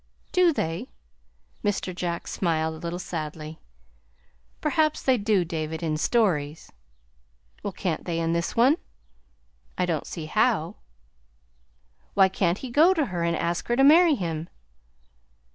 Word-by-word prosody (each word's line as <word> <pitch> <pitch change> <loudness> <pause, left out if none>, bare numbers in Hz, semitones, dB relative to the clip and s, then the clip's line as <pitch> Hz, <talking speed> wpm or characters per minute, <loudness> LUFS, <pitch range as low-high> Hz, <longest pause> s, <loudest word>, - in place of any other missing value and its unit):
"Do 365 -2 +4
they?" 165 - -3 0.7
Mr. 200 -2 -1
Jack 175 -1 -3
smiled 160 -3 0
a 160 - -9
little 170 +1 -4
sadly. 155 -2 -6 1.0
"Perhaps 310 0 +1
they 260 - +4
do, 205 -5 +1
David, 160 -1 -4
in 155 -2 0
stories." 160 -6 0 0.9
"Well, 200 - -3
can't 175 -3 -3
they 170 -2 -2
in 165 0 0
this 170 0 -2
one?" 260 +7 +5 1.0
"I 180 - +1
don't 165 -4 -2
see 165 -3 -6
how." 205 0 +1 1.4
"Why 195 -1 +6
can't 185 -1 0
he 255 +1 -7
go 325 +8 +5
to 310 -4 +1
her 170 -1 -1
and 170 0 +1
ask 170 +2 -2
her 240 - +1
to 270 - +4
marry 320 +2 +7
him?" 165 - -4
175 Hz, 140 wpm, -26 LUFS, 165-240 Hz, 1.4 s, marry